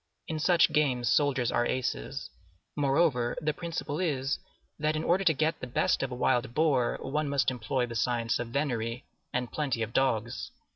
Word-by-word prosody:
In 160 -1 -3
such 170 0 +4
games 130 -6 +2
soldiers 135 -5 +2
are - - +2
aces. 120 - -3 0.4
Moreover, 140 -4 +2
the 155 -1 0
principle 165 -3 -4
is, 140 -6 0 0.4
that 155 +1 +1
in 155 - -1
order 180 +4 +2
to 175 - +5
get 155 +3 0
the 125 - -5
best 125 - +1
of 135 - -2
a - - -3
wild 125 -1 +1
boar, 140 -7 +2
one 150 +2 -1
must 140 -2 +2
employ 125 +1 -1
the 120 - -7
science 115 0 0
of 120 - -3
venery 120 -3 -2 0.3
and 125 -1 -2
plenty 135 -7 -1
of 110 +1 -5
dogs. 120 -2 0
135 Hz, 180 wpm, -29 LUFS, 120-150 Hz, 0.4 s, to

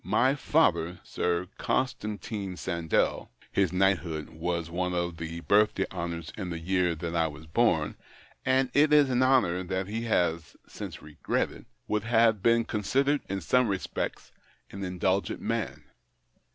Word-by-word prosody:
My 110 +8 +3
father, 90 - +2
Sir 90 +1 -1
Constantine 105 -5 -2
Sandell 85 -2 0
— - - -26
his 95 -4 +2
knighthood 90 -5 +1
was 85 +1 -2
one 90 +1 -2
of 85 -1 -2
the 85 +1 -5
birthday 100 0 +3
honours 85 -3 -5
in 95 -4 -5
the 85 - -3
year 90 0 +1
that 85 +1 -4
I 80 -1 +2
was 75 0 -9
born, 80 -4 +1 0.5
and 130 0 +2
it 150 +1 +4
is 145 -3 +5
an 125 0 +2
honour 130 -9 +3
that 95 +1 -2
he 110 +4 -4
has 85 -6 0
since - - -8
regretted 75 -1 -3
— - - -46
would 105 +1 -1
have 115 -3 +4
been 115 +1 +3
considered, 135 +8 +1
in 95 0 -2
some 125 +8 +3
respects, 95 -3 -3 0.4
an 100 - -6
indulgent 95 0 0
man. - - -3
95 Hz, 150 wpm, -28 LUFS, 85-110 Hz, 0.5 s, is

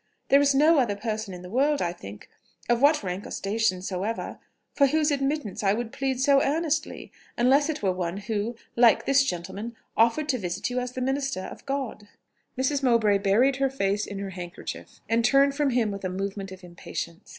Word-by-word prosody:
There 275 +1 +6
is 285 -1 +3
no 305 +2 +5
other 230 -6 +1
person 215 -1 -4
in 180 -1 -9
the 180 - -9
world, 285 +5 +2
I 175 -1 -1
think, 100 - -11 0.4
of 240 0 +2
what 295 -2 +4
rank 185 +1 -4
or - - -10
station 200 -2 -1
soever, 195 +4 -4 0.3
for 280 - +4
whose 305 +2 +2
admittance 275 -6 -1
I 195 -1 +3
would 230 +1 -3
plead 265 -2 -2
so 275 0 +4
earnestly, 310 +1 -1 0.3
unless 275 +5 +4
it 305 - -3
were 190 - +3
one 180 0 -3
who, 210 +3 -3 0.2
like 235 -2 +5
this 275 0 +4
gentleman, 195 +2 -5 0.2
offered 235 +7 +3
to 255 - +1
visit 180 +5 -3
you 250 - 0
as 250 0 -4
the 255 - -4
minister 270 -4 -1
of - - -10
God." 270 -6 -4 0.5
Mrs. 270 +2 0
Mowbray 230 -6 +3
buried 235 +8 +3
her 270 0 +1
face 205 -5 -1
in 200 - -6
her 195 -1 -5
handkerchief, 180 +1 -8
and 230 +1 +2
turned 275 +3 +4
from 290 0 +1
him 240 -4 +1
with 200 -1 -7
a 185 - -1
movement 195 +1 -4
of 190 0 -11
impatience. 170 -1 -7
235 Hz, 200 wpm, -26 LUFS, 195-275 Hz, 0.5 s, There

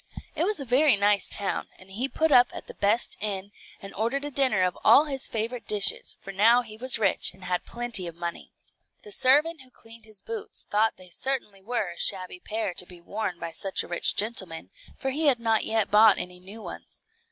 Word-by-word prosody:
It 335 - -1
was 420 -2 -1
a 275 - -6
very 265 +2 +4
nice 205 0 +1
town, 200 -2 0
and 185 +1 -15
he 245 +8 -3
put 320 +2 0
up 245 -2 +7
at - - -8
the - - -11
best 210 +4 0
inn, 200 -1 -2 0.3
and 195 - -11
ordered 250 +7 -2
a 290 - -4
dinner 255 -9 +2
of 180 -1 0
all 295 - +6
his 270 -3 -3
favorite 230 +2 -4
dishes, 205 -1 +3
for 195 - -9
now 230 +5 +4
he 215 -2 -10
was 255 +3 +2
rich 205 -4 +2
and 185 - -17
had 180 -1 -3
plenty 235 -6 +2
of 170 - -8
money. 170 0 -7 0.5
The 425 - -11
servant, 305 -1 +3
who 260 - -17
cleaned 230 -2 -15
his 215 -3 -16
boots, 450 -2 -7
thought 215 +2 +1
they 185 -1 -13
certainly 225 -3 -3
were 210 -3 -3
a 170 - -12
shabby 185 -2 -2
pair 215 -1 -4
to 180 - -4
be 180 -1 -13
worn 190 +1 -5
by 170 -1 -6
such 195 +3 -2
a - - -11
rich 175 - +3
gentleman, 190 -7 -2 0.3
for 270 - -3
he 305 +3 +1
had 260 -4 +4
not 225 -1 +1
yet 220 -2 0
bought 210 0 +6
any 180 0 -6
new 200 +4 -11
ones. - - -11
220 Hz, 220 wpm, -26 LUFS, 195-255 Hz, 0.5 s, up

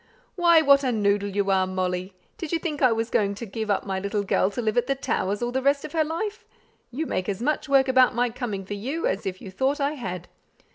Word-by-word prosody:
"Why, 340 -3 +5
what 280 -1 +5
a 255 - +1
noodle 205 -2 +1
you 200 0 0
are, 190 -1 +2
Molly! 185 0 -3 0.2
Did 330 - -5
you 335 - +2
think 315 -3 -4
I 255 -3 +5
was 225 +1 -1
going 200 -1 +1
to 235 - -6
give 220 +1 -5
up 200 - 0
my 190 -1 -2
little 200 +1 -2
girl 190 -1 +2
to 205 - -6
live 220 -3 0
at 245 - +1
the 275 - +1
Towers 205 -5 -1
all 240 - -1
the 265 +1 -1
rest 280 +1 +2
of - - -7
her 320 -2 +2
life? 340 +7 -4 0.5
You 295 +6 -3
make 185 -8 -2
as 195 -1 -2
much 300 +4 -1
work 270 -1 +4
about 260 -1 +4
my 245 0 +1
coming 220 -6 -4
for 205 - -5
you, 265 +11 -3
as 195 +1 -1
if 185 -1 -5
you 190 - -8
thought 265 +9 0
I 280 +1 +1
had. 185 - -6
230 Hz, 255 wpm, -25 LUFS, 200-280 Hz, 0.5 s, Why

